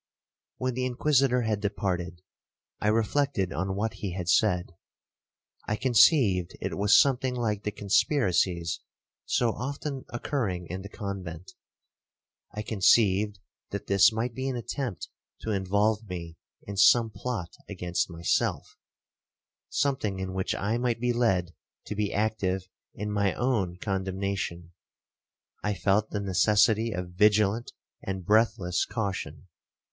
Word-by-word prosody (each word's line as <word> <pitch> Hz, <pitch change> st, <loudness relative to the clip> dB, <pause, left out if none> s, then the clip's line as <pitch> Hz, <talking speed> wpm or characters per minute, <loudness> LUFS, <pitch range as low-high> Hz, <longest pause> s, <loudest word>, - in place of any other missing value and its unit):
'When 130 Hz, 0 st, -1 dB
the 130 Hz, +1 st, -1 dB
Inquisitor 125 Hz, -1 st, +2 dB
had 110 Hz, -2 st, 0 dB
departed, 90 Hz, -4 st, -2 dB, 0.6 s
I -, -, -1 dB
reflected 110 Hz, -, +1 dB
on 95 Hz, +3 st, -2 dB
what 110 Hz, +3 st, -1 dB
he 95 Hz, -4 st, -5 dB
had 90 Hz, -2 st, -4 dB
said. 90 Hz, -2 st, +2 dB, 1.0 s
I 105 Hz, -, 0 dB
conceived 115 Hz, -, +4 dB
it -, -, -3 dB
was 100 Hz, +1 st, +5 dB
something 130 Hz, -2 st, +2 dB
like 110 Hz, -4 st, -1 dB
the 105 Hz, -, -3 dB
conspiracies 95 Hz, -, +1 dB, 0.5 s
so 120 Hz, -2 st, +2 dB
often 140 Hz, +3 st, -5 dB
occurring 115 Hz, -8 st, -2 dB
in 95 Hz, +1 st, -4 dB
the 100 Hz, -, -9 dB
convent. 95 Hz, -5 st, -6 dB, 1.0 s
I 105 Hz, +1 st, -5 dB
conceived 105 Hz, -1 st, +3 dB, 0.3 s
that 100 Hz, -, -5 dB
this 100 Hz, +1 st, +5 dB
might 115 Hz, +2 st, -2 dB
be 130 Hz, +2 st, -3 dB
an 130 Hz, -, -2 dB
attempt 120 Hz, -, -4 dB, 0.3 s
to 110 Hz, -, -3 dB
involve 105 Hz, +2 st, +1 dB
me 85 Hz, -2 st, -6 dB, 0.3 s
in 100 Hz, -1 st, -7 dB
some 115 Hz, +3 st, +5 dB
plot 100 Hz, -4 st, -4 dB, 0.2 s
against 90 Hz, -3 st, -2 dB
myself, 85 Hz, 0 st, -1 dB, 0.9 s
something 130 Hz, -9 st, 0 dB
in 95 Hz, 0 st, -4 dB
which 95 Hz, 0 st, -1 dB
I 110 Hz, +4 st, -1 dB
might 120 Hz, -2 st, 0 dB
be 125 Hz, 0 st, +1 dB
led 95 Hz, -8 st, +1 dB, 0.3 s
to 105 Hz, -, -5 dB
be 105 Hz, -1 st, -1 dB
active 95 Hz, -3 st, -1 dB, 0.3 s
in 105 Hz, +1 st, -4 dB
my 100 Hz, -1 st, +1 dB
own 105 Hz, -9 st, 0 dB
condemnation,—I 95 Hz, +1 st, -5 dB
felt 105 Hz, +3 st, +1 dB
the 105 Hz, -, -3 dB
necessity 105 Hz, +4 st, +3 dB
of 90 Hz, -2 st, -4 dB
vigilant 105 Hz, +4 st, +3 dB, 0.3 s
and 95 Hz, -2 st, -5 dB
breathless 105 Hz, -4 st, +2 dB
caution. 100 Hz, -3 st, -4 dB
105 Hz, 130 wpm, -28 LUFS, 95-115 Hz, 1.0 s, was